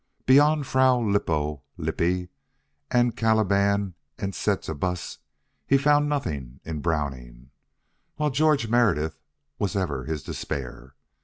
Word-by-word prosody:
Beyond 145 +2 +5
"Fra 130 -1 +4
Lippo 80 - 0 0.2
Lippi" 90 +1 -1 0.6
and 120 -1 +2
"Caliban 100 -3 +2 0.2
and 100 -1 -3
Setebos," 90 -3 -2 0.5
he 135 - +5
found 145 +1 +3
nothing 70 - -3
in 80 -2 -5
Browning, 65 -5 -3 0.6
while 150 -1 0
George 150 -3 +2
Meredith 105 -10 +1 0.4
was 100 0 -1
ever 75 -10 -2
his 80 -2 -4
despair. 70 -3 -6
100 Hz, 105 wpm, -25 LUFS, 75-125 Hz, 0.6 s, Beyond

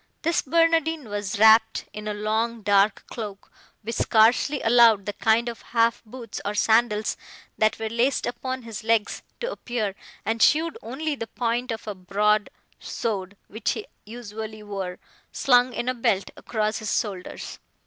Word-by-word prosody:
This 335 +1 +2
Barnardine 325 -2 +2
was 205 -2 -3
wrapt 220 +1 +5
in 210 0 -7
a 210 - -1
long 220 +2 -1
dark 200 0 +3
cloak, 210 -4 -8 0.3
which 230 +3 -4
scarcely 235 +6 +3
allowed 225 -3 +5
the 205 - -3
kind 225 +3 +2
of 235 -1 -5
half 230 -1 +1
boots, 230 -1 -8
or 205 +1 -3
sandals, 220 0 +2 0.4
that 215 0 +3
were 225 - -3
laced 235 +4 +1
upon 255 +1 -4
his 230 -1 -7
legs, 225 -1 +1 0.2
to - - -2
appear, 230 - -3 0.3
and 225 +1 -1
showed 320 +5 +4
only 285 +7 -3
the 230 -5 -5
point 240 +1 -2
of 220 -1 -6
a 210 - -2
broad 205 +3 +1 0.3
sword, 200 -3 -4
which 220 +2 -2
he 220 - -6 0.2
usually 215 -1 -8
wore, 195 -3 -5 0.3
slung 250 -1 +3
in 240 +1 -4
a 255 - +2
belt 205 -5 0
across 215 -1 -2
his 215 -3 0
shoulders. 195 -4 -6
225 Hz, 160 wpm, -25 LUFS, 210-240 Hz, 0.4 s, wrapt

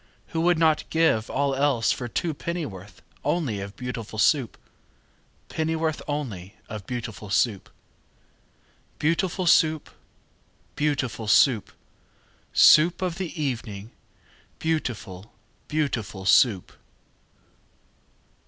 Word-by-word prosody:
Who 160 - -2
would 175 0 +3
not 160 -1 +2
give 160 -9 +2
all 140 -1 0
else 135 -4 +2
for 125 - -3
two 160 +7 -2
Pennyworth 140 - -6 0.2
only 145 - -1
of 100 +1 -7
Beautiful 115 -4 -6
Soup? 130 +1 +2 0.9
Pennyworth 160 -1 -1
only 115 -11 -5
of 105 -4 -8
beautiful 115 -4 -6
Soup? 105 -1 0 1.3
Beau 150 - +1
ootiful 185 +1 -2
Soo 160 -1 +5
oop! 155 - -14 0.8
Beau 150 - -1
ootiful 115 -5 -4
Soo 125 +3 +6
oop! 105 - -15 0.8
Soo 155 +2 +7
oop 175 +1 -7
of 180 0 -2
the 185 - -2
e 155 -1 -5
e 140 - +2
evening, 110 -2 -8 0.7
Beautiful, 115 - -3 0.4
beauti 150 -7 0
FUL 95 -2 -10
SOUP! 100 -1 +4
135 Hz, 120 wpm, -25 LUFS, 110-160 Hz, 1.3 s, Soo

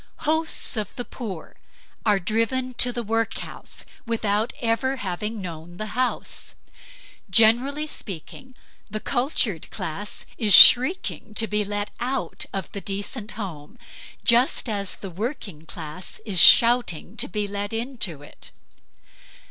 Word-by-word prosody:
Hosts 315 -5 0
of 210 -3 -3
the 245 - -4
poor 200 -10 -8 0.5
are 210 -1 +4
driven 230 +6 -1
to 245 - +6
the 240 -1 -3
workhouse 225 +1 -4 0.2
without 220 -1 0
ever 235 +3 0
having 210 0 -4
known 175 -1 -8
the 215 +1 -5
house. 250 +1 -2 0.7
Generally 240 +8 +4
speaking, 255 - -7 0.3
the 215 - -4
cultured 245 - -1
class 200 +6 -4
is 210 -5 +6
shrieking 255 - +6
to 225 - +3
be 210 -1 0
let 205 0 -3
out 245 -8 -3
of 195 -3 -5
the 200 - -5
decent 205 +3 -3
home, 190 -1 -8 0.5
just 245 +2 +4
as 200 -3 -1
the 195 - -9
working 195 - -6
class 160 +2 -7
is 195 -5 +4
shouting 235 -8 +5
to - - +1
be 205 +2 -2
let 205 0 -4
into 225 - -3
it. - - -10
215 Hz, 130 wpm, -24 LUFS, 195-245 Hz, 0.7 s, to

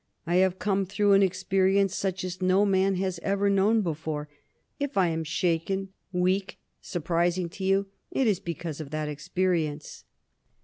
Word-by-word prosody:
I 175 +1 +1
have 185 0 +3
come 195 -1 0
through 205 +1 +2
an 195 0 +6
experience 190 +1 +2
such 190 -1 -2
as 185 0 -5
no 185 +2 +4
man 195 0 +2
has 185 -1 -2
ever 200 0 +1
known 205 +3 +3
before. 155 -3 -3 0.5
If 285 -3 -3
I 185 -3 +4
am 165 0 -2
shaken, 175 +4 -1 0.2
weak, 185 +2 0 0.2
surprising 175 +1 0
to 190 - -8
you, 195 +1 +2 0.2
it 265 - 0
is 210 -5 +2
because 165 -2 -5
of 145 - -8
that 155 0 -3
experience." 155 0 -2
185 Hz, 160 wpm, -27 LUFS, 170-195 Hz, 0.5 s, an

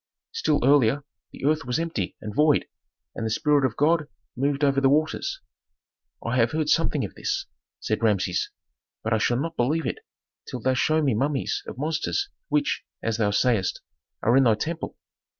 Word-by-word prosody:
"Still 455 - +1
earlier 140 -1 +4 0.3
the - - -7
earth 155 +2 +2
was 125 0 -1
empty 160 - -2
and 105 -1 -6
void, 150 +4 +3 0.5
and - - -5
the 110 - -1
spirit 145 +5 +2
of 125 -4 0
God 155 +1 +3 0.3
moved 140 +3 0
over 140 -1 +3
the 135 - +5
waters." 155 - 0 0.8
"I - - 0
have - - +3
heard 155 -1 0
something - - +2
of - - -8
this," - - -2 0.3
said 110 - -2
Rameses, 95 -6 +1 0.5
"but 110 - 0
I 110 - +2
shall 120 +3 +1
not 165 +3 -3
believe 150 +7 +1
it - - -2 0.5
till 130 - -4
thou 130 +3 +1
show 155 +4 +2
me 135 -4 +2
mummies 135 +5 0
of - - -7
monsters 160 - -1 0.2
which, 295 -1 +1 0.2
as 115 -1 0
thou 105 -3 +2
sayst, 100 -2 +1 0.4
are 115 - +4
in 135 - +6
thy 115 -2 +5
temple." 160 +9 -4
140 Hz, 180 wpm, -25 LUFS, 115-155 Hz, 0.8 s, in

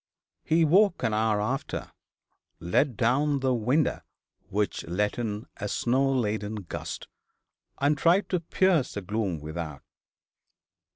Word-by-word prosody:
He 165 +1 +3
woke 190 +4 +4
an 110 - +1
hour 110 -1 +2
after, 125 +6 -3 0.7
let 105 - +1
down 140 +4 +2
the 130 -1 +2
window, 125 +6 +1 0.5
which 105 +1 -1
let 105 +7 -1
in 105 -2 -3
a 100 - -3
snow 130 +6 +1
laden 110 -4 -1
gust, 85 - -6 0.7
and 145 +2 +2
tried 170 +7 +3
to 180 - +1
pierce 170 -3 +1
the 100 - -3
gloom 100 -3 -2
without. 80 -2 -6
120 Hz, 125 wpm, -27 LUFS, 105-145 Hz, 0.7 s, woke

